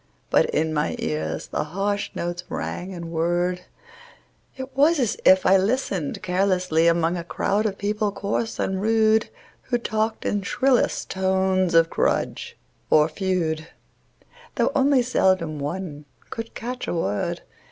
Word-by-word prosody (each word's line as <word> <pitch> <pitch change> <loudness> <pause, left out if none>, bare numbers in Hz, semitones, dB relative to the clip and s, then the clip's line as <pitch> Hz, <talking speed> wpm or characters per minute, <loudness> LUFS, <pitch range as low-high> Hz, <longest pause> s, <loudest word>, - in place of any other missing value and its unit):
But - - +4
in 160 +1 0
my 150 0 0
ears 80 +1 -3
the - - -2
harsh 200 +6 -2
notes 175 0 -3
rang 185 +2 -4
and 170 -2 -7
whirred; 175 +2 0 1.0
It 260 0 -7
was 305 +5 +4
as 240 -5 +1
if 185 0 +6
I 190 +1 +6
listened 195 - -1
carelessly 180 -3 +2
Among 170 0 +2
a 170 - -4
crowd 205 +5 0
of 200 -2 -4
people 210 +1 -1
coarse 205 +3 -2
and 190 0 -1
rude, 220 0 +3 0.4
Who 245 - +2
talked 220 -1 -2
in 205 - 0
shrillest 255 +6 +1
tones 190 -1 +1
of 165 0 +5
grudge - - -1 0.3
or 150 0 +5
feud, 165 -3 -1 0.9
Though - - +2
only 275 -2 +3
seldom 185 -10 +1
one 150 0 -5 0.3
could 230 0 -6
catch 250 +2 -5
a - - -2
word. 105 - -2
190 Hz, 140 wpm, -24 LUFS, 165-215 Hz, 1.0 s, if